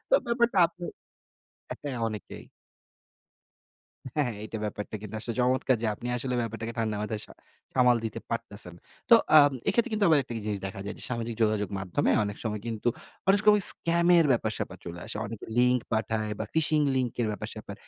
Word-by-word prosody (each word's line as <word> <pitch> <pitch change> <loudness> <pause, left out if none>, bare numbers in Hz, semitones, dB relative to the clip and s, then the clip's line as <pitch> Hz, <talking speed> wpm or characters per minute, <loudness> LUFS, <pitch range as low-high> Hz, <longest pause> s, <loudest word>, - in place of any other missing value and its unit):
তো - - +5
ব্যাপারটা 235 -3 +1
আপনি 175 +1 -11 0.8
অ্যা - - -4
হ্যাঁ 130 -4 -3
অনেকেই। 105 -4 -8 1.7
হ্যাঁ, 150 -2 +1
হ্যাঁ। 110 - -5
এইটা 110 0 -6
ব্যাপারটা 105 0 -5
কিন্তু 105 0 -8
আসলে 115 0 -3
চমৎকার 130 +1 +2
যে - - +1
আপনি 120 - -9
আসলে 125 +1 -2
ব্যাপারটাকে 115 0 -5
ঠান্ডা 110 -2 -1
মাথায় 105 0 -3
সা - - -14 0.4
সামাল 125 -2 +5
দিতে 110 - -4
পারতেছেন। 105 -6 -2 0.4
তো - - +11 0.2
আম 145 -1 +6 0.2
এক্ষেত্রে 235 +1 +2
কিন্তু 215 -1 +1
আবার 155 - +5
একটা 120 - -9
কি - - -4
জিনিস 100 -2 -2
দেখা 95 0 -7
যায় - - -4
যে - - -6
সামাজিক 115 -1 -3
যোগাযোগ 105 -2 +1
মাধ্যমে 95 +9 0
অনেক 100 0 -5
সময় 105 -2 -2
কিন্তু 115 0 -2 0.4
অনেক 200 +1 +5
ক - - -14
ওই 210 - +2
সময় - - +7
স্কামের 170 0 +3
ব্যাপার 110 -2 0
স্যাপার 95 - -5
চলে 85 0 -7
আসে। - - -4
অনেকে 110 0 -8
লিঙ্ক 125 0 +4
পাঠায় 110 -1 -1
বা 110 - -2
ফিশিং 155 -1 +2
লিঙ্ক 125 -3 0
এর - - 0
ব্যাপার-স্যাপার। 100 - -7
115 Hz, 190 wpm, -27 LUFS, 105-145 Hz, 1.7 s, তো